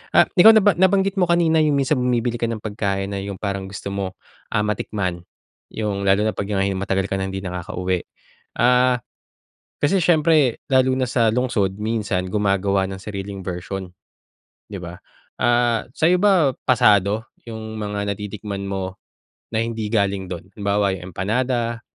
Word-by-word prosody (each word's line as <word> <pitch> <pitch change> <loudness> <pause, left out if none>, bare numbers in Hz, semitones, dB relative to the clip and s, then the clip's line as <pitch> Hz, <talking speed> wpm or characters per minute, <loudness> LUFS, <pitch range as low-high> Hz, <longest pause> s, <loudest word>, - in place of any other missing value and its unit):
Ah, - - +7
ikaw 195 +4 +9
naba 205 -3 +5
nabanggit 195 +1 +3
mo 180 - +3
kanina 170 -2 +3
yung 150 -2 +2
minsan 140 +2 +2
bumibili 120 -1 0
ka 115 - 0
ng 115 -1 -3
pagkain 100 -2 -2
na 100 - -3
yung 100 0 -5
parang 100 -2 -3
gusto 100 - -7
mo, 100 -1 -4 0.4
ah, 105 - +1
matikman 95 -4 -2 0.5
yung 105 -2 -3
lalo 100 +1 +3
na - - +1
'pag 100 - -3
hi 100 -1 +1
matagal 95 0 -1
ka 95 - -2
ng 95 0 -3
hindi 95 - -4
nakakauwi. 90 0 -3 0.5
Ah, 125 +1 +3 0.8
kasi 150 +7 +3
siyempre 155 -6 +3
lalo 130 -1 +4
na 130 - +1
sa 120 -4 +3
lungsod 110 -6 0
minsan 105 -4 -1
gumagawa 100 -1 +1
ng 95 0 -7
sariling 100 -1 -6
version, 90 +1 -5 0.8
di 105 - -8
ba? 90 0 -8 0.4
Ah, 120 -1 +2
sa'yo 175 +3 +3
ba 185 -8 +4 0.2
pasado 105 -2 +3 0.2
yung 110 -1 -7
mga 105 -1 -2
natitikman 100 0 -5
mo 95 -1 -4 0.5
na 110 - +1
hindi 115 -2 -3
galing 100 -3 0
dun? 90 0 -7
Halimbawa, 100 0 0
yung 90 0 -10
empanada 115 +4 -1
105 Hz, 160 wpm, -21 LUFS, 95-125 Hz, 0.8 s, ikaw